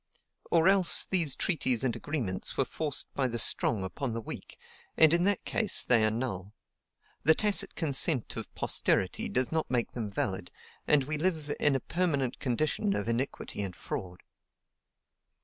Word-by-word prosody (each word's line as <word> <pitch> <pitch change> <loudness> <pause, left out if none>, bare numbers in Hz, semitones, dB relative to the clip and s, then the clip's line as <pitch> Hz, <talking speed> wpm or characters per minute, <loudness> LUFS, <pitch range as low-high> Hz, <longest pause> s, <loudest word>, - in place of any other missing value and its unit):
or 165 +1 +3
else 190 -2 +5
these 165 -8 +2
treaties 130 - 0
and 125 -3 0
agreements 120 -12 -3
were 135 - +2
forced 150 0 -2
by 135 -2 0
the 120 -1 -3
strong 115 -2 +2
upon 120 +6 -4
the 115 - -3
weak, - - -8 0.4
and 160 0 +6
in 175 +1 +2
that 200 -1 +1
case 215 -5 +1
they 120 -3 +3
are 110 - +3
null; 105 -4 -4 0.7
the 160 +3 +5
tacit 210 -2 +4
consent 145 -4 0
of - - -7
posterity - - 0
does 125 0 -1
not 160 -1 -1
make 120 -2 -1
them 115 -4 -5
valid, 95 -2 -3 0.4
and 150 -2 +4
we 150 +3 -4
live 155 -4 -1
in 145 -2 +3
a - - +1
permanent 140 -5 -1
condition 155 - -1
of 105 - -3
iniquity 115 -2 -3
and 95 -3 -5
fraud. 90 -1 -7
135 Hz, 165 wpm, -29 LUFS, 115-160 Hz, 0.7 s, and